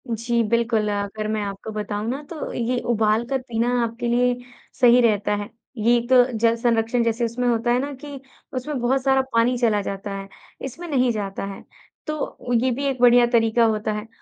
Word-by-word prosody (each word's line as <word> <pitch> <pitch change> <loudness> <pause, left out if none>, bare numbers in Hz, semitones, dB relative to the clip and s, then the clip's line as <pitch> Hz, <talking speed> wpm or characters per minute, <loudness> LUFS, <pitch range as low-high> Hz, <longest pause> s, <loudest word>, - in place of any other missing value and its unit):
जी, 235 +1 0
बिल्कुल। 225 -1 +1
अगर 205 +1 -3
मैं 215 -1 -1
आपको 200 +2 -6
बताऊँ 210 0 -4
ना 270 +4 -3
तो 325 -3 -5
ये 245 +1 -1
उबाल 220 0 +2
कर 265 +1 -2
पीना 235 +1 0
आपके 230 +1 -3
लिए 245 +1 +2 0.4
सही 245 0 +6
रहता 210 -3 +2
है। 205 0 -5 0.3
ये 230 +3 +3
एक 240 +1 -4
तो 255 -1 +7
जल 230 +1 +3
संरक्षण 235 0 +1
जैसे 230 +1 0
उसमें 240 +2 -2
होता 240 0 +1
है 245 - +3
ना 280 +2 -3
कि 285 -2 -7 0.3
उसमें 260 +2 -3
बहुत 255 +2 +1
सारा 265 0 +3
पानी 235 +2 +3
चला 225 -4 +2
जाता 200 +1 -5
है 195 0 -7 0.4
इसमें 335 +7 -7
नहीं 255 -5 +2
जाता 200 -3 -4
है। - - -12 0.4
तो 305 -5 -4
ये 250 +2 +2
भी 275 +4 -3
एक 270 -2 -1
बढ़िया 245 0 +7
तरीक़ा 230 0 +4
होता 215 -1 0
है। 210 +1 -5
235 Hz, 200 wpm, -23 LUFS, 220-250 Hz, 0.4 s, तो